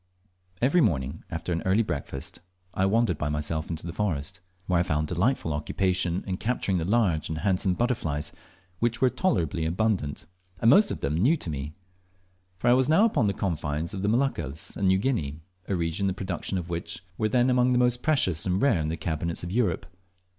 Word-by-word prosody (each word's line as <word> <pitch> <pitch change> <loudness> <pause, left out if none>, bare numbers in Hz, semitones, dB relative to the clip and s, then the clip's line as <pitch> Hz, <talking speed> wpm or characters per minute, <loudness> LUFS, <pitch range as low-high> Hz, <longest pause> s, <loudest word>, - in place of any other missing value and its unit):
Each 130 - +3
morning 80 - +1
after 80 +2 -4
an 85 - -1
early 95 +5 +3
breakfast 70 -7 -5 0.3
I 95 +1 +2
wandered 105 -5 +2
by 75 - -1
myself 75 +1 -2
into 80 -1 -4
the 85 - -5
forest, 95 -3 -2 0.3
where 90 -2 +2
I - - +4
found 75 -3 0
delightful 90 - 0
occupation 90 +3 0
in 95 -2 -2
capturing 105 -5 0
the 80 - -2
large 95 -6 +1
and 80 - -3
handsome 95 0 +1
butterflies, 85 - -1 0.5
which 120 0 0
were 130 -1 +3
tolerably 85 - 0
abundant, 90 -3 -1 0.3
and 115 - +5
most 205 +1 +6
of - - -4
them 70 - -1
new 120 - +3
to 85 - -5
me; 75 +1 -5 0.8
for 120 - -2
I 120 - +7
was 130 +2 +3
now 165 +8 +6
upon 165 - +2
the 100 - +1
confines 80 -4 -2
of 95 - -4
the 100 - +1
Moluccas 110 - -1
and 100 - 0
New 95 0 +4
Guinea, 85 - -1 0.3
a 100 - 0
region 85 +3 -1
the 95 - 0
productions 95 0 -3
of 85 -2 -4
which 85 +1 -4 0.2
were 110 - +1
then 125 +3 +3
among 125 0 +3
the 125 - +3
most 125 0 +2
precious 95 - +2
and 90 +1 +1
rare 125 -8 +3
in 75 0 -1
the 80 - -3
cabinets 85 +1 -2
of 85 - -5
Europe. 105 -6 0
95 Hz, 200 wpm, -27 LUFS, 80-115 Hz, 0.8 s, I